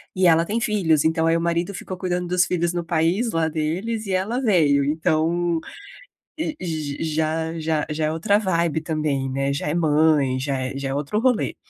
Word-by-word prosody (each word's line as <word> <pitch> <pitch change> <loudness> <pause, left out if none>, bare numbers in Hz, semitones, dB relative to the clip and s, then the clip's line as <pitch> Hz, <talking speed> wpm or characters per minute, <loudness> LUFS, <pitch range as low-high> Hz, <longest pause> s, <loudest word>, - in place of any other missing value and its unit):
e 185 -1 +3
ela 165 0 +4
tem 220 +5 -2
filhos, 180 -10 +2
então 160 0 +1
aí 165 0 +3
o 165 - 0
marido 170 +3 -1
ficou 185 0 -7
cuidando 180 -1 -2
dos 180 0 +2
filhos 175 -2 -1
no 175 -1 -2
país 170 +8 +1
lá 165 -1 +1
deles 180 +9 -2
e 195 - -3
ela 200 +7 0
veio. 160 - +3
Então, 160 +3 0 1.0
já 160 0 -2
já 155 -1 -1
já 155 0 -1
é - - -1
outra 165 +6 +2
vibe 170 -5 0
também, 150 -4 -1
né? 135 +1 -1
Já 145 - -3
é - - -1
mãe, 150 -4 +3
já 135 +1 -2
é 130 +1 -4
já 135 0 -3
é - - -2
outro 145 +8 -2
rolê. 250 -2 +1
165 Hz, 190 wpm, -22 LUFS, 155-180 Hz, 1.0 s, ela